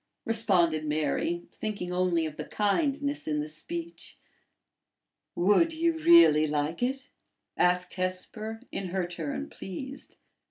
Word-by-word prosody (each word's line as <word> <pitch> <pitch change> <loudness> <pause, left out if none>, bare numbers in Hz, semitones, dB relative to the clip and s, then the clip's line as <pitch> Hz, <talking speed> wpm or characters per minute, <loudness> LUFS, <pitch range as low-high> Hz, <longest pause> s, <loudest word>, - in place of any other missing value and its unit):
responded 180 -9 +2
Mary, 155 +3 -1
thinking 200 -5 -4
only 180 -2 +1
of 155 -1 -5
the 150 - -5
kindness 280 - 0
in 150 -1 0
the 150 - -2
speech. 335 - -7 1.2
"Would 210 - +3
you 335 +1 +1
really 315 - +7
like 150 +4 -2
it?" 265 +2 -2 0.5
asked 180 0 +2
Hesper, 215 +5 -4
in 195 - -4
her 185 0 -1
turn 275 +11 -4
pleased. 260 - -8
185 Hz, 120 wpm, -28 LUFS, 165-270 Hz, 1.2 s, really